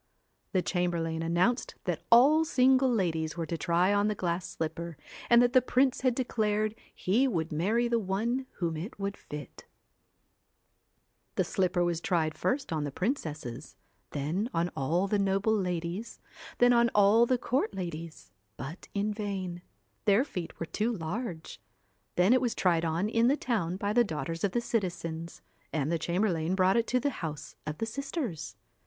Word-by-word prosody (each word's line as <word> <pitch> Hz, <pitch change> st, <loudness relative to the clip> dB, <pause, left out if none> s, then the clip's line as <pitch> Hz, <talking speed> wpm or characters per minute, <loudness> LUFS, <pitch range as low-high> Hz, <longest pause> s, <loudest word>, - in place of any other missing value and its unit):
The 185 Hz, -2 st, +2 dB
chamberlain 170 Hz, -3 st, -1 dB
announced 175 Hz, +9 st, +1 dB
that -, -, -2 dB
all 280 Hz, +7 st, +7 dB
single 265 Hz, -4 st, +4 dB
ladies 165 Hz, -7 st, 0 dB
were 165 Hz, -, -2 dB
to 165 Hz, -, -3 dB
try 175 Hz, +4 st, +2 dB
on 205 Hz, 0 st, +3 dB
the 210 Hz, -, 0 dB
glass 175 Hz, -1 st, -2 dB
slipper, 165 Hz, 0 st, -4 dB, 0.3 s
and 235 Hz, 0 st, +7 dB
that 245 Hz, +1 st, +2 dB
the 255 Hz, -, +7 dB
prince 255 Hz, +1 st, +2 dB
had 255 Hz, -2 st, +2 dB
declared 215 Hz, -4 st, 0 dB, 0.2 s
he 230 Hz, +9 st, +2 dB
would 165 Hz, -9 st, -1 dB
marry 210 Hz, +10 st, +1 dB
the 235 Hz, -1 st, +2 dB
one 225 Hz, +7 st, -1 dB
whom 165 Hz, -3 st, -2 dB
it 180 Hz, +8 st, -6 dB
would 200 Hz, 0 st, -2 dB
fit 150 Hz, -7 st, -9 dB, 1.7 s
The -, -, +2 dB
slipper 180 Hz, -1 st, +1 dB
was 170 Hz, -1 st, 0 dB
tried 160 Hz, -4 st, 0 dB
first 265 Hz, -, -1 dB
on 155 Hz, -2 st, -1 dB
the 145 Hz, -, -3 dB
princesses, 155 Hz, -, -4 dB, 0.3 s
then 160 Hz, -, -2 dB
on 170 Hz, +1 st, +1 dB
all 165 Hz, +8 st, +1 dB
the 205 Hz, +1 st, +1 dB
noble 195 Hz, +2 st, +2 dB
ladies, 180 Hz, +3 st, -3 dB, 0.4 s
then 245 Hz, 0 st, +5 dB
on 235 Hz, 0 st, +4 dB
all 210 Hz, +3 st, +6 dB
the 255 Hz, -, +3 dB
court 240 Hz, -2 st, -1 dB
ladies, 170 Hz, -3 st, -6 dB, 0.3 s
but 140 Hz, -, -7 dB
in 205 Hz, +1 st, 0 dB
vain; 190 Hz, -4 st, -4 dB, 0.4 s
their 210 Hz, +3 st, +5 dB
feet 180 Hz, -, -6 dB
were 165 Hz, -, -2 dB
too 215 Hz, +7 st, -1 dB
large. 180 Hz, -2 st, -5 dB, 0.5 s
Then 180 Hz, +6 st, +5 dB
it 255 Hz, -, +4 dB
was 245 Hz, -3 st, 0 dB
tried 170 Hz, -3 st, +2 dB
on 165 Hz, +4 st, 0 dB
in 230 Hz, +2 st, +3 dB
the 280 Hz, +3 st, +3 dB
town 190 Hz, -, -1 dB
by 205 Hz, +1 st, -1 dB
the 240 Hz, +1 st, +5 dB
daughters 165 Hz, -, -4 dB
of 200 Hz, -2 st, +1 dB
the 240 Hz, -, +1 dB
citizens, 170 Hz, -7 st, -3 dB, 0.3 s
and 150 Hz, 0 st, -1 dB
the 170 Hz, -, +1 dB
chamberlain 175 Hz, 0 st, 0 dB
brought 190 Hz, 0 st, +3 dB
it 230 Hz, -, +1 dB
to 250 Hz, -, +2 dB
the 285 Hz, +3 st, 0 dB
house 155 Hz, -2 st, -5 dB
of 150 Hz, 0 st, -3 dB
the 225 Hz, -, -1 dB
sisters. 240 Hz, -, -4 dB
190 Hz, 170 wpm, -29 LUFS, 165-235 Hz, 1.7 s, all